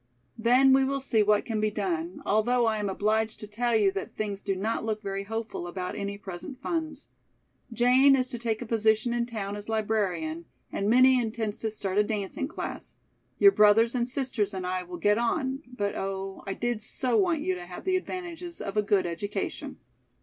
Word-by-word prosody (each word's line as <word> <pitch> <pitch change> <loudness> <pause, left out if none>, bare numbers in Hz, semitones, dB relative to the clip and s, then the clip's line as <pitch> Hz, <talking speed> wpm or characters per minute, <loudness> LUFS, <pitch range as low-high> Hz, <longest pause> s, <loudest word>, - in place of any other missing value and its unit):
Then 255 +4 +5
we 270 0 +5
will 275 +1 0
see 235 -5 +2
what 210 0 +3
can 220 -2 -2
be 215 - +2
done, 180 -4 -3
although 235 +4 +2
I 220 -1 +1
am 205 -1 -1
obliged 215 +3 0
to - - -5
tell 230 +3 0
you 205 -3 +4
that 195 - -6
things 205 -2 -3
do 195 -2 -1
not 215 +5 -2
look 215 -1 -2
very 195 0 -3
hopeful 225 -4 -4
about 180 +1 -4
any 200 0 -4
present 195 +6 -8
funds. 310 -1 -3 0.6
Jane 255 +4 +5
is 255 -1 +1
to 240 -3 -5
take 230 0 -1
a - - -8
position 220 +1 +2
in 240 0 0
town 205 -4 -4
as 205 +1 -7
librarian 190 -7 -1 0.3
and 200 +1 -1
Minnie 255 +2 +6
intends 220 -2 -3
to 220 - -1
start 200 -2 -1
a - - +5
dancing 205 -3 -3
class. - - -6 0.4
Your 400 - +8
brothers 225 - +5
and 245 -1 0
sisters 245 -7 -1
and 185 -1 -4
I 185 0 -1
will 180 0 -8
get 205 +5 +3
on, 265 +3 -1
but 205 -5 -2
oh, 195 0 -4
I 195 - -2
did 240 -2 -2
so 245 +3 0
want 335 -2 +2
you 185 - 0
to 175 -1 -7
have 180 - -8
the 375 -1 +2
advantages 350 -2 -4
of 195 - -5
a 210 - +4
good 200 -2 +2
education." 175 +4 -4
215 Hz, 200 wpm, -28 LUFS, 200-245 Hz, 0.6 s, Your